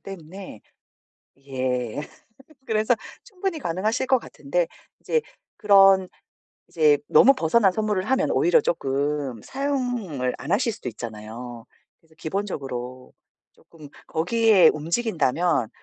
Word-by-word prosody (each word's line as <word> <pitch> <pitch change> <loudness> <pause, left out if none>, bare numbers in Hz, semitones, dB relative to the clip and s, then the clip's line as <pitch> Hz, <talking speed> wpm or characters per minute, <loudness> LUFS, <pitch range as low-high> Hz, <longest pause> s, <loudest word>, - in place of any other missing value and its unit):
때문에 185 - -10 0.9
예. 130 -1 -2 0.6
그래서 220 +2 +2 0.3
충분히 380 -7 -4
가능하실 215 +7 -1
것 260 - +4
같은데 - - -2 0.3
이제 470 -1 0 0.4
그런 195 -3 +5 0.6
이제 155 -3 +3
너무 265 - +6
벗어난 195 -1 +3
선물을 210 -2 -1
하면 265 +4 +1
오히려 480 - +4
쪼끔 140 - -2
사용을 245 - -2
안 150 - -7
하실 230 +3 +2
수도 125 - -9
있잖아요. 115 +1 -8 0.3
그래서 160 -1 -27
기본적으로 135 -9 -5 0.4
쪼끔 155 -3 -16 0.2
거기에 190 +1 +4
움직인다면 165 - 0
175 Hz, 260 characters per minute, -24 LUFS, 135-225 Hz, 0.9 s, 너무